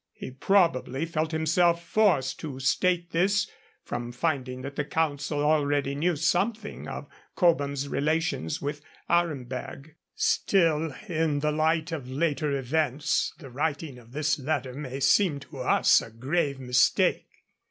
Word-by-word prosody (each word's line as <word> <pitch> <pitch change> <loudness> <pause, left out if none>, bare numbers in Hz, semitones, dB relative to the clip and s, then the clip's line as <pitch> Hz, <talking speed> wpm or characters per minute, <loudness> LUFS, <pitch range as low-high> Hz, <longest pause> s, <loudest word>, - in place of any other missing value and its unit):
He - - -8
probably 165 -2 +2
felt 160 -1 -2
himself 170 +2 +2
forced 170 -13 +2
to 140 -5 -6
state 170 +5 +1
this 200 +4 +2 0.4
from 120 0 -4
finding 130 -2 -2
that 140 +1 -6
the 150 - -1
Council 145 -1 -1
already 145 -2 +2
knew 165 +5 +1
something 210 +8 -1
of - - -6 0.3
Cobham's 140 -5 +2
relations 150 - -1
with 145 +1 -4 0.3
Aremberg. 140 -3 -2 0.2
Still, 165 -5 +2 0.2
in 160 -4 0
the 150 0 +1
light 160 +2 +1
of 140 -6 -5
later 145 +1 0
events, 150 +3 0
the 140 -6 -11
writing 145 -1 -3
of 115 -1 -18
this 150 +2 0
letter 135 -2 -2
may 135 -1 -6
seem 155 0 +3
to 140 -1 -11
us 125 - +4
a - - -9
grave 140 +5 -1
mistake. 125 0 +2
150 Hz, 135 wpm, -27 LUFS, 135-165 Hz, 0.4 s, us